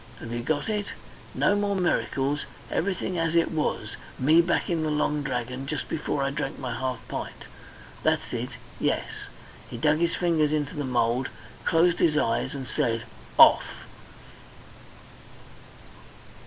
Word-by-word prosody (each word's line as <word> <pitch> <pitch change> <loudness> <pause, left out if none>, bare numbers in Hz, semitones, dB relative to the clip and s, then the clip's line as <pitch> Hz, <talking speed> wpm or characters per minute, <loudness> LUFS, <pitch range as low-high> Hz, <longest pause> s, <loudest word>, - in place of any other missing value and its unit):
Have 115 - -7
you 120 - -2
got 145 +3 -1
it? 210 -2 -1 0.5
No 205 - +3
more 205 -1 +1
miracles, 145 -6 0 0.3
everything 185 -1 -1
as 165 0 0
it 170 - +3
was 155 -2 -2 0.2
me 155 +6 +5
back 170 - 0
in 170 -2 0
the 155 - 0
Long 150 0 +1
Dragon 125 0 -3
just 150 +1 -3
before 150 -2 -1
I 135 - 0
drank 140 +1 -3
my 125 -3 -4
half 130 +2 -3
pint. - - -6 0.6
That's - - 0
it! - - -2 0.3
Yes." - - +1 0.6
He - - -6
dug 150 +6 +3
his 170 0 +1
fingers 160 -4 +2
into 150 -1 -1
the 145 - -2
mould, 120 +1 +1 0.4
closed 170 +1 +3
his 150 -3 +3
eyes, 130 0 0
and 135 -2 -5
said 115 -2 0 0.3
"Off!" - - +6
150 Hz, 145 wpm, -26 LUFS, 130-165 Hz, 0.6 s, Off